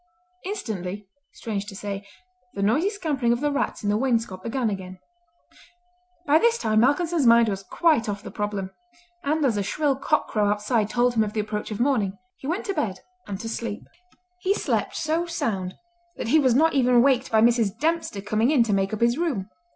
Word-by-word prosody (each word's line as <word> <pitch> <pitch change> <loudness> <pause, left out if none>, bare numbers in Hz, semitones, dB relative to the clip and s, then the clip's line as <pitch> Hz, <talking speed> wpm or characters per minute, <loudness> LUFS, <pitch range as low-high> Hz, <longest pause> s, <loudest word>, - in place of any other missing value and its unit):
Instantly, 205 - -5 0.3
strange 205 -3 -4
to 200 - -8
say, 200 0 -5 0.5
the 200 - -2
noisy 285 - +2
scampering 300 - -1
of 240 - +1
the 295 +1 0
rats 280 - -2
in 205 - 0
the 210 - +2
wainscot 230 -6 0
began 235 +3 -1
again. 185 -1 -6 1.3
By 300 +2 +5
this 470 +4 +3
time 215 - +1
Malcolmson's 295 +3 +2
mind 230 -1 +6
was 195 -1 -3
quite 265 - +1
off 205 0 -4
the 200 - -8
problem; 205 -2 -3 0.5
and 305 0 +1
as 230 -6 +1
a - - +1
shrill 285 +7 0
cock 290 +3 0
crow 210 -2 +1
outside 210 +1 0
told 245 +2 +2
him 220 -2 +3
of 210 -1 -4
the 220 - -2
approach 210 +1 -3
of 210 - -5
morning, 230 -7 +1 0.2
he 265 - -7
went 345 +6 -2
to 395 - -1
bed 195 - -2 0.3
and 195 -2 -5
to 230 - -5
sleep. 225 -2 -4 0.6
He 380 +2 +1
slept - - -1
so 330 +1 -1
sound 195 - -2 0.4
that - - -4
he 315 - +5
was 260 -5 +3
not 320 +4 +4
even 250 -3 +4
waked 265 -1 +2
by 220 -1 +4
Mrs. 230 -3 +3
Dempster 320 -8 -1
coming 215 +4 +1
in 285 -6 +4
to 220 -3 -1
make 195 +1 0
up 215 - -10
his 235 +4 +2
room. 240 - -2
230 Hz, 200 wpm, -24 LUFS, 205-285 Hz, 1.3 s, mind